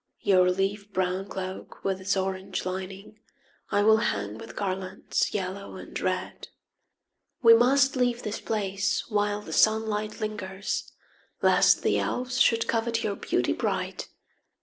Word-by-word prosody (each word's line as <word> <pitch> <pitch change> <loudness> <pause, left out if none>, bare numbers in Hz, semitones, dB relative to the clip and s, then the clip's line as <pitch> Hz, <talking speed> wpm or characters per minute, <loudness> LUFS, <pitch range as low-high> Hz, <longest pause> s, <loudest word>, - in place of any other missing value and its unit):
Your 185 -2 +4
leaf 195 +2 -1
brown 185 0 -1
cloak 190 -1 -7
with 190 -1 -1
its 190 +1 0
orange 190 0 -3
lining 190 +3 -6 0.5
I 205 - +2
will 220 +1 +6
hang 105 - -2
with - - -10
garlands 190 -1 -2
yellow 195 0 -4
and - - -7
red. - - -3 1.0
We 230 -1 +9
must 270 +4 +4
leave 245 -1 +1
this 210 - -4
place 195 -2 -1
while 205 -1 0
the - - -8
sunlight 215 -1 +2
lingers 205 -2 -4 0.5
Lest - - +5
the - - +2
elves 250 0 -1
should 230 -1 +3
covet 230 0 0
your 205 -2 -1
beauty - - 0
bright. - - -2
200 Hz, 135 wpm, -27 LUFS, 190-220 Hz, 1.0 s, We